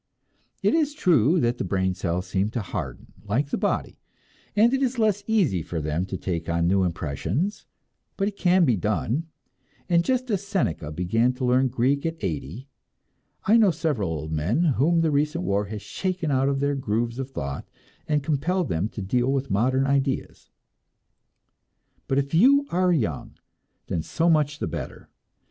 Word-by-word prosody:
It - - +3
is 300 -2 +1
true 165 - +3
that 120 +1 0
the - - 0
brain 95 0 0
cells 90 -1 -2
seem 95 +2 0
to - - 0
harden 75 -11 -6
like 120 +8 -1
the - - +1
body, 205 0 -1 0.6
and 225 +4 +5
it 270 - +1
is 260 -1 0
less 210 -3 +1
easy 180 - +2
for 80 +1 -4
them 80 +4 -2
to 95 - -4
take 85 -3 -3
on 85 0 +1
new 95 +1 +3
impressions; 90 - -2 0.5
but 195 - +1
it 205 - -4
can 180 -2 +3
be 125 -6 +3
done, 110 - -1 0.6
and 170 -2 +3
just 255 +2 0
as 200 -2 0
Seneca 180 - -2
began 115 +10 +1
to 125 0 -3
learn 130 +2 +3
Greek 130 +3 +1
at 165 0 -4
eighty, 90 - -4 0.8
I 220 +4 +5
know 220 -4 +5
several 145 - -1
old 80 -1 -4
men 85 - +1
whom 165 +2 +3
the 160 -2 +2
recent 150 +4 0
war 100 - 0
has 105 +1 -7
shaken 185 -5 -2
out 135 0 +2
of 140 -1 -1
their 140 0 +1
grooves 120 -2 -2
of 135 0 -4
thought 70 - -5 0.4
and 150 -2 +1
compelled 160 +4 0
to 100 +6 -2
deal 125 +6 +1
with 135 0 -1
modern 130 +6 +2
ideas. 140 -1 -1 1.6
But 135 - 0
if 140 +1 -1
you 275 - +5
are 180 +1 +2
young, 110 - -1 0.5
then 80 - -2
so 165 - +1
much 150 -2 +2
the - - -3
better! - - -7
135 Hz, 175 wpm, -25 LUFS, -, 1.6 s, and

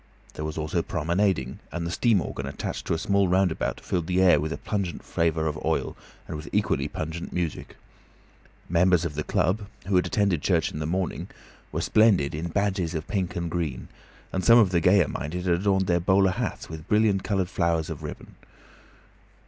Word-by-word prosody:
There 75 - -6
was 75 0 -5
also 80 +2 -1
promenading, 85 -4 0
and 85 -1 -3
the 85 - -3
steam 110 0 +3
organ - - -5
attached - - -5
to - - +1
a - - -1
small 100 +2 +2
roundabout 90 -2 +1
filled 85 -3 -2
the 90 0 +1
air 90 -5 +6
with 80 +2 -2
a - - -3
pungent 100 -6 -3
flavour 80 -1 0
of 75 -1 -3
oil - - -1 0.3
and - - -5
with 75 - -7
equally - - +1
pungent 80 +2 -5
music. 85 -4 -3 0.9
Members 90 0 +3
of 80 - -3
the 75 +1 -3
club, 100 +7 0 0.2
who 100 0 0
had 90 - +2
attended 100 - +1
church 90 +2 +1
in 75 - -6
the 75 - -2
morning, 90 +1 -2 0.4
were - - -2
splendid 100 -10 +3
in 80 +3 -3
badges 95 -2 -1
of 75 - -4
pink 95 -4 -2
and 85 -1 -3
green, 80 -8 -3 0.4
and 95 - -1
some 115 0 +7
of 105 -6 +5
the 85 - +3
gayer 90 -2 +5
minded 85 +7 -4
had 90 - +2
also 85 - 0
adorned 95 -1 +2
their 85 -1 +2
bowler 95 +2 +3
hats - - -3
with 80 0 -9
brilliant 105 -3 +3
coloured 95 -3 0
favours 85 -3 0
of - - -6
ribbon. - - -8
90 Hz, 195 wpm, -26 LUFS, 80-95 Hz, 0.9 s, some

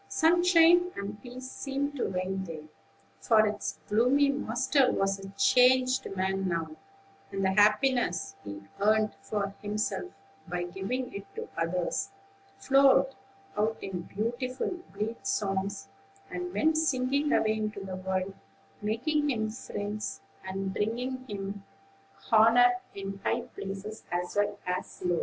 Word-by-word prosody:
Sunshine 350 +1 +5
and 200 +1 -6
peace 255 +1 -8
seemed 280 +1 -3
to 260 - -1
reign 190 +1 -2
there; 160 -3 -7 0.6
for 220 -2 +4
its 210 -1 -2
gloomy 250 +7 +4
master 265 0 +2
was 195 0 0
a 195 0 -8
changed 255 +2 +4
man 190 0 0
now, 165 -3 -2 0.6
and 195 0 -1
the 190 - +3
happiness 210 -4 +3
he 100 -1 -7 0.2
earned 215 +1 +3
for 200 -2 -2
himself, 210 - -2 0.4
by 175 0 -2
giving 195 +9 -3
it 200 0 -7
to 455 +1 -5
others, 175 - -1 0.5
flowed 275 -5 +5 0.4
out 215 +1 +1
in 185 -2 -4
beautiful, 240 - -3 0.2
blithe 210 +4 -4
songs, 195 -1 -1 0.4
and 360 0 -4
went 315 -2 +2
singing 280 0 +1
away 215 0 +3
into 210 -2 -3
the 190 -1 -5
world, 190 +1 -2 0.5
making 290 +8 0
him 220 -4 0
friends, 205 -2 -5 0.2
and 190 0 -3
bringing 250 +5 -2
him 200 0 -5 0.7
honor 230 +3 +7 0.2
in 195 0 -5
high - - +1
places 200 +3 -7
as 175 +2 -2
well 205 0 +1
as 180 0 -4
low. 175 -1 +2
210 Hz, 130 wpm, -29 LUFS, 195-255 Hz, 0.7 s, honor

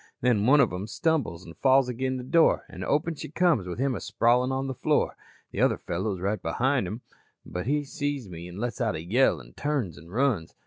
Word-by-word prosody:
"Then 115 -3 +2
one 145 +3 +6
of - - +3
'em 95 +3 -4
stumbles 120 - -1
an' 85 - -10
falls 135 +3 +4
agin 130 +1 -2
the 125 - -6
door 165 +6 +3
an' - - -7
open 150 +3 +1
she 150 - -8
comes 160 - +2
with 90 - -5
him 135 +1 +1
a 105 - -3
sprawlin' 120 +5 +2
on 135 +1 -1
the 135 - -3
floor. - - +1 0.4
The - - -2
other - - +3
fellow 95 +5 -2
is - - -9
right 100 +3 -1
behin' 130 -5 0
him 110 +6 -5 0.4
but 90 +5 -5
he 145 +2 +1
sees 145 - -3
me 85 -1 -8
an' 90 +1 -10
lets 120 +4 -3
out 110 -6 +1
a 80 - -5
yell 105 - +3
an' - - -14
turns 135 - -2
an' 80 - -15
runs. 115 -6 0
125 Hz, 230 wpm, -27 LUFS, 95-140 Hz, 0.4 s, one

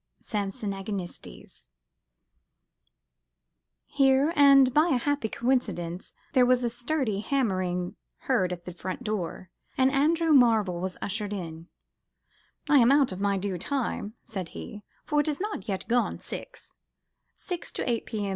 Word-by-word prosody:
(Samson 200 -1 -3
Agonistes). 195 - -7 2.2
Here, 275 +2 +3 0.4
by 310 +3 +4
a 270 - +3
happy 285 -2 -1
coincidence, 190 -9 -2 0.2
there 255 -3 +5
was 250 0 +3
a 235 - 0
sturdy 240 -3 -1
hammering 185 -8 -1 0.3
heard 190 -9 +1
at 175 -1 -6
the 180 - -7
front 185 +7 -6
door, 190 -4 -4 0.3
and 260 0 +4
Andrew 320 +3 +3
Marvell 220 -9 +4
was 185 0 -4
ushered 205 +1 -3
in, 165 -4 -6 1.0
"I 290 - +6
am 240 +1 +5
out 280 -4 +4
of 185 +1 -6
my 200 -1 +1
due 190 -2 -3
time," 235 - -2
said 190 -6 -5
he, 210 - -8 0.2
"for 295 -1 +1
it 295 - +1
is 300 -2 -1
not 410 - -4
yet 195 -3 -3
gone 245 +1 +1
six," - - -9 0.6
(six 355 -2 -5
to - - -3
eight 235 -2 -1
P.M. 205 -2 -3
220 Hz, 140 wpm, -27 LUFS, 190-270 Hz, 2.2 s, I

